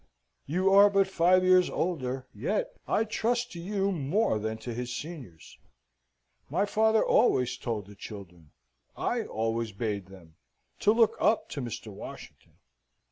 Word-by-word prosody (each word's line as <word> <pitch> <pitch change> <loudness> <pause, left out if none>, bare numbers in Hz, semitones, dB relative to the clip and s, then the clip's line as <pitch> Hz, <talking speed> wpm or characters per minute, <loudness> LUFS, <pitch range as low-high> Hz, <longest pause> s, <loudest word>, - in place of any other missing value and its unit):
You 185 +6 +2
are 200 +1 +8
but 195 -1 +3
five 185 0 +3
years 185 0 +5
older, 135 -7 -2
yet 145 - -2
I 220 - +2
trust 235 +2 -1
to 175 - -8
you 195 +2 -1
more 165 - 0
than 110 +1 -3
to 120 - -4
his 125 +1 -4
seniors; 135 - -9 0.9
my 180 +8 +1
father 220 +1 +2
always 125 - +3
told 115 -5 -4
the 105 - -13
children, 90 -6 -11 0.5
I - - -1
alway 115 0 -2
bade 100 -2 -3
them, 85 -5 -16 0.4
to 205 - +4
look 225 0 +3
up 220 - +2
to 140 - -5
Mr. 115 -3 -6
Washington." - - -11
145 Hz, 145 wpm, -28 LUFS, -, 0.9 s, are